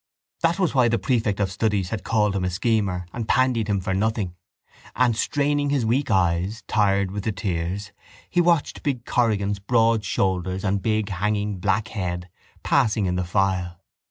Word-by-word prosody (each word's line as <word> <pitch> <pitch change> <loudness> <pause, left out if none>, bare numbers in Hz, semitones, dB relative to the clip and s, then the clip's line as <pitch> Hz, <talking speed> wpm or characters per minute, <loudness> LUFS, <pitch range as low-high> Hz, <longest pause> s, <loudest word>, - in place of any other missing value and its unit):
That 165 +2 +2
was 185 -4 +1
why 130 -3 +4
the 115 0 +2
prefect 110 -1 0
of 95 -2 0
studies 100 -2 0
had 110 -3 -3
called 105 -3 +1
him 95 - -1
a 90 - 0
schemer 95 -2 0
and 115 -2 -4
pandied 125 -4 +2
him 100 -2 +1
for 95 +1 -2
nothing: 105 -2 -1 0.6
and, 125 -3 +3
straining 145 +4 0
his 140 -5 +1
weak 130 +6 +1
eyes, 95 +1 +1
tired 100 -2 +2
with 100 0 -4
the 110 - 0
tears, 100 0 -3 0.4
he 175 - +2
watched 170 -3 +1
big 130 -5 -2
Corrigan's 105 -4 +1
broad 115 +1 +2
shoulders 95 -1 -1
and 100 -1 0
big 110 -1 0
hanging 105 +1 -1
black 110 +4 0
head 90 -4 -4 0.3
passing 110 -6 +2
in 90 -1 0
the 90 - 0
file. 90 -1 0
105 Hz, 175 wpm, -24 LUFS, 95-115 Hz, 0.6 s, why